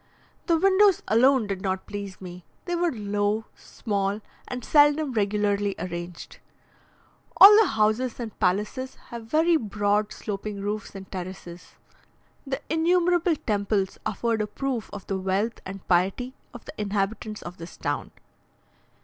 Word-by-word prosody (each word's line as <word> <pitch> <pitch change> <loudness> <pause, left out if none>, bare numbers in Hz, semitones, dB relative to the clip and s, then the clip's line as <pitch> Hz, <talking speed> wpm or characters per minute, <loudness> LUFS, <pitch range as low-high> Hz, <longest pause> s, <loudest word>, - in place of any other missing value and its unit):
The 335 - +4
windows 390 +2 +4
alone 255 +2 +4
did 195 -2 -4
not 190 -1 -2
please 200 -2 -7
me; 180 -1 -9 0.2
they 350 -1 -1
were 345 0 +1
low, 205 0 -1
small, 200 -2 -3 0.3
and 250 -2 -5
seldom 295 -1 +4
regularly 205 -1 0
arranged. 175 -1 -7 1.0
All 410 +2 +11
the 430 - +3
houses 220 +2 +1
and 225 -3 -7
palaces 210 +7 -1 0.2
have 235 -1 -7
very 325 +5 +3
broad 205 -2 0
sloping 205 0 -5
roofs 205 +1 -4
and 190 -1 -9
terraces. 180 -2 -8 0.7
The 270 +1 -3
innumerable 345 +1 +2
temples 200 -2 0
afford 220 +1 -1
a 210 - -1
proof 260 -2 -3
of 205 - -8
the 195 -1 -2
wealth 195 +5 -1
and 195 0 -9
piety 190 +8 +1 0.2
of 240 - -12
the - - -9
inhabitants 210 +1 -2
of 175 +1 -8
this 170 +1 -10
town. - - -3
210 Hz, 140 wpm, -25 LUFS, 195-260 Hz, 1.0 s, All